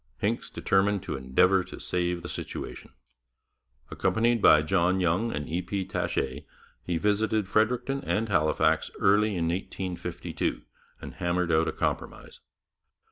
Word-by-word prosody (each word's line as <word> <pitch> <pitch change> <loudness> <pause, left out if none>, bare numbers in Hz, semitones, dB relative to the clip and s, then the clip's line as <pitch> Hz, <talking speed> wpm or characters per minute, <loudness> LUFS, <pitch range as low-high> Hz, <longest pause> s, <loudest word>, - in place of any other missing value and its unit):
Hincks - - -2
determined 100 0 +1
to - - -4
endeavour 90 +9 +3
to 95 - -10
save 90 -1 -2
the - - -5
situation. - - -6 1.0
Accompanied 115 0 +1
by 75 -5 +7
John 90 +3 +2
Young 90 +6 +1
and 75 0 -4
E. 85 +3 -1
P. 95 +2 -3
Taché, 70 -6 -2 0.4
he 85 -1 -2
visited 105 +2 +1
Fredericton 125 +6 +1
and 110 +2 0
Halifax 80 -6 +2
early 105 +1 +3
in 85 -2 0
1852, 90 -7 -4 0.4
and - - -8
hammered 85 0 -1
out 80 +1 +3
a - - 0
compromise. - - -4
90 Hz, 135 wpm, -27 LUFS, 85-105 Hz, 1.0 s, by